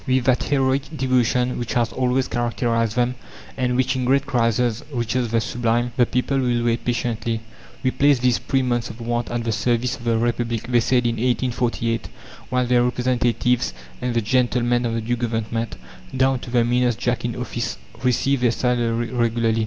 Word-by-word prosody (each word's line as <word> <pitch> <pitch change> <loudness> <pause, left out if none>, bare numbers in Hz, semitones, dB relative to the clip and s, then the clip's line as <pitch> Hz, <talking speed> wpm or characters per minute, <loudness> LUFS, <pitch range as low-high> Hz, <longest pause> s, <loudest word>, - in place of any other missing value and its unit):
With 130 -1 +2
that 125 0 +2
heroic 135 +2 0
devotion 125 -1 +1
which 120 - -3
has 120 -2 +1
always 130 0 +1
characterized 115 -2 0
them, 125 0 +1 0.4
and 125 -1 0
which 130 +1 +1
in 130 - -1
great 135 +2 +3
crises 120 -3 +1
reaches 120 -1 -1
the 115 +1 +2
sublime, 120 +1 0
the 120 - +3
people 130 +2 0
will 120 -2 +1
wait 120 0 0
patiently. 115 -2 -1 0.4
"We 130 - +2
place 140 0 +4
these 125 -1 +2
three 135 -1 0
months 120 -1 -1
of 110 - -10
want 120 0 -2
at 120 -1 -2
the 115 - -1
service 120 +2 0
of 120 - -12
the 115 -1 +2
Republic," 115 -1 -1
they 120 -1 +3
said 125 +1 +2
in 115 -1 0
1848, 120 -2 0 0.4
while 125 0 +1
"their 120 0 +3
representatives" 125 0 +1 0.3
and 125 -1 -2
the 115 - +3
gentlemen 120 +1 +1
of 115 - -2
the 115 - -1
new 120 +2 -1
Government, 115 -1 -2 0.4
down 130 0 +3
to 125 - -9
the 120 -1 +3
meanest 120 -1 +2
Jack 120 0 -1
in 120 -1 -2
office 120 -1 -3 0.3
received 130 +1 +2
their 125 - +4
salary 120 -1 0
regularly. 115 -2 +1
120 Hz, 185 wpm, -22 LUFS, 115-125 Hz, 0.4 s, place